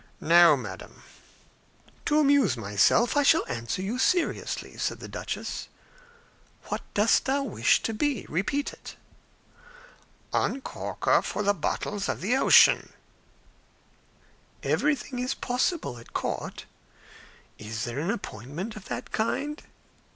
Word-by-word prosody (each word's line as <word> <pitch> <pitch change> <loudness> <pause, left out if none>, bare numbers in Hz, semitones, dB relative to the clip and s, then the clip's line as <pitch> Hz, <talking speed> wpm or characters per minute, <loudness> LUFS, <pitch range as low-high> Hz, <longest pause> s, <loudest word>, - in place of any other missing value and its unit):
"No, 170 -2 +6
madam." 105 -7 -9 1.0
"To 300 - +3
amuse 280 - +3
myself, 105 - +2
I 290 - +4
shall 315 +3 +4
answer 115 +10 -4
you 225 +6 -3
seriously," 350 +5 0
said - - -2
the - - -8
duchess. - - -5 1.0
"What - - -2
dost 210 +2 +3
thou 275 +1 +1
wish 275 - +2
to 225 - -1
be? 275 0 -1
Repeat 240 - -1
it." - - -11 1.4
"Uncorker 270 - -2 0.3
of 210 - -1
the 205 - +4
bottles 195 +3 -3
of - - -2
the 220 +7 +1
ocean." 270 - +5 1.7
"Everything 285 -4 0
is 250 +1 -1
possible 250 - -1
at 115 - -16
court. - - -4 0.9
Is 110 +1 -5
there 120 +3 -4
an 165 +5 -2
appointment 170 - -5
of 205 -3 -10
that - - -6
kind?" 290 +7 -2
210 Hz, 120 wpm, -27 LUFS, -, 1.7 s, No